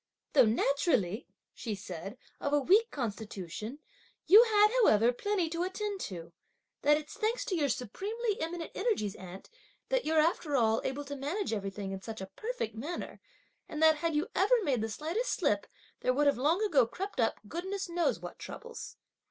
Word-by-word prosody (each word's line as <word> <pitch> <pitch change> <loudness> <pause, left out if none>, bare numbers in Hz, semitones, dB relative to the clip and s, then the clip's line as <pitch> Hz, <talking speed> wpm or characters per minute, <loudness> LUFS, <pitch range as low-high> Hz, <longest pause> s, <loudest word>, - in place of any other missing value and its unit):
'Though 265 -4 +7
naturally,' 240 - +1 0.3
she 220 -4 -4
said, 195 +2 -7 0.2
'of 285 - -2
a 290 - +5
weak 405 - +4
constitution, 215 - -5 0.5
you 420 +4 +9
had, 425 -2 +5
however, 230 - +5
plenty 390 +5 0
to 335 +1 -3
attend 395 +2 -2
to! 170 -3 -6 0.5
that 295 +1 +5
it's 300 0 -7
thanks 460 +1 -1
to 375 - -1
your 295 -4 +1
supremely 410 - -2
eminent 330 +1 -4
energies, 390 - 0
aunt, 185 +1 -10 0.4
that - - +1
you're, 320 +1 +1
after 310 -2 +1
all, 225 -3 +3
able 280 +2 -3
to 285 +1 -5
manage 295 - -2
everything 195 -1 -4
in 190 0 -5
such 225 +2 -7
a 190 - -4
perfect 485 +1 -3
manner; 290 +11 -6 0.5
and 305 - -5
that 315 -1 +6
had 330 0 -1
you 305 +6 +1
ever 450 +3 +3
made 265 - +1
the 220 - -2
slightest 330 - -2
slip, - - +1 0.3
there 255 - +1
would 295 +2 +3
have 285 - +4
long 325 +10 +2
ago 285 - +4
crept 385 - -6
up, 225 -2 +1
goodness 375 - -4
knows, 345 0 0
what - - -9
troubles!'" 475 0 -8
295 Hz, 175 wpm, -31 LUFS, -, 0.5 s, you